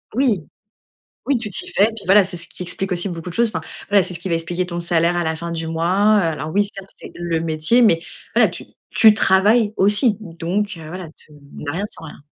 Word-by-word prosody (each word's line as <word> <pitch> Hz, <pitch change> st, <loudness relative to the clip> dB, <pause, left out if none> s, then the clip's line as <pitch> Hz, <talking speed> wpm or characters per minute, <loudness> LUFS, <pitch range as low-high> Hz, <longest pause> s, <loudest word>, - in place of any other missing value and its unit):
Oui, 245 Hz, -8 st, +2 dB, 0.9 s
oui, 280 Hz, -3 st, +2 dB
tu 220 Hz, -2 st, -4 dB
t'y -, -, -1 dB
fais, 200 Hz, -, +4 dB
puis 215 Hz, -, -9 dB
voilà, 195 Hz, +2 st, +6 dB
c'est 180 Hz, -, -5 dB
ce 170 Hz, -, -5 dB
qui 180 Hz, -, -5 dB
explique 190 Hz, +2 st, -4 dB
aussi 175 Hz, +2 st, 0 dB
beaucoup 170 Hz, -1 st, -6 dB
de -, -, -8 dB
choses. 235 Hz, +1 st, +2 dB
Enfin 160 Hz, -, -2 dB, 0.3 s
voilà, 200 Hz, -2 st, +5 dB
c'est 180 Hz, -, -4 dB
ce 170 Hz, -, -5 dB
qui 190 Hz, -, -5 dB
va 170 Hz, -, +1 dB
expliquer 175 Hz, +2 st, -2 dB
ton 175 Hz, -1 st, -5 dB
salaire 170 Hz, 0 st, +1 dB
à 175 Hz, -, 0 dB
la 160 Hz, 0 st, -1 dB
fin 170 Hz, +1 st, -6 dB
du 165 Hz, -1 st, -4 dB
mois, 185 Hz, +6 st, +2 dB
heu, -, -, +3 dB
alors 155 Hz, -1 st, -3 dB
oui, 205 Hz, +2 st, +2 dB
certes, 195 Hz, -1 st, -10 dB
c'est -, -, -11 dB
le 170 Hz, -1 st, -2 dB
métier, 160 Hz, +9 st, +2 dB
mais 170 Hz, -8 st, +4 dB, 0.4 s
voilà, -, -, +5 dB
tu -, -, -9 dB, 0.3 s
tu 220 Hz, -2 st, +7 dB
travailles 210 Hz, +3 st, +3 dB
aussi, 205 Hz, +3 st, +3 dB
donc 190 Hz, +2 st, -3 dB
voilà, 165 Hz, +2 st, -8 dB
tu 150 Hz, -, -22 dB, 0.2 s
n'as 145 Hz, -, -5 dB
rien 195 Hz, +6 st, -3 dB
sans -, -, -9 dB
rien. 150 Hz, -, -12 dB
180 Hz, 240 wpm, -20 LUFS, 165-205 Hz, 0.9 s, tu